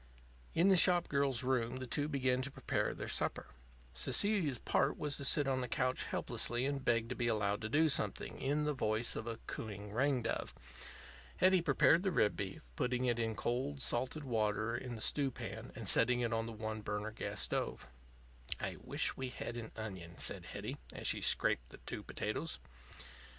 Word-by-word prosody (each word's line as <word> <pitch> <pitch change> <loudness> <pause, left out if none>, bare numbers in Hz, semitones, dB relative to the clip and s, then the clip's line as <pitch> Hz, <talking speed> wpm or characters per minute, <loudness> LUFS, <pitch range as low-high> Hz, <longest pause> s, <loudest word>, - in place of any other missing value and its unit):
In 175 +4 +5
the 190 - +7
shop 175 0 +6
girl's 140 -4 +2
room 125 -2 0
the 130 0 -5
two 145 +4 0
began 130 -3 +1
to 135 - -3
prepare - - -1
their - - -5
supper. - - 0 0.5
Cecilia's 165 - +2
part 140 +5 +1
was 150 -2 -2
to - - -4
sit 140 0 +4
on 130 -1 +1
the 125 - -2
couch 130 +2 0
helplessly 120 +2 0
and 140 -1 -2
beg 115 -2 +2
to 125 - -3
be 120 - 0
allowed 105 -2 +1
to 110 - -3
do 155 +6 +4
something, 145 - -1
in 145 +3 +1
the 150 0 +1
voice 115 -3 0
of 110 - -5
a 115 -1 -3
cooing 105 -2 -6
ring 130 +1 +2
dove. 115 - -3 0.8
Hetty 185 -1 +5
prepared 165 0 +4
the 195 - +1
rib 105 -10 +3
beef, 95 -1 -5
putting 125 - 0
it 120 -1 +1
in 115 -1 -1
cold 135 +6 -2
salted 130 +4 0
water 110 -2 0
in 125 0 -5
the 110 - -7
stew 140 +3 +2
pan 130 - -7
and - - -5
setting 125 0 +5
it 120 -1 0
on 115 0 -1
the - - -5
one 110 0 -4
burner 105 +1 -3
gas 110 - -4
stove. 60 - -1 0.7
"I - - -3
wish - - -1
we 130 -1 -3
had 120 -1 -5
an 120 -2 -6
onion," 95 -6 -7
said - - -1
Hetty, - - -5
as - - -8
she - - +1
scraped - - +2
the - - -11
two - - -4
potatoes. - - -2
125 Hz, 190 wpm, -35 LUFS, 110-140 Hz, 0.8 s, the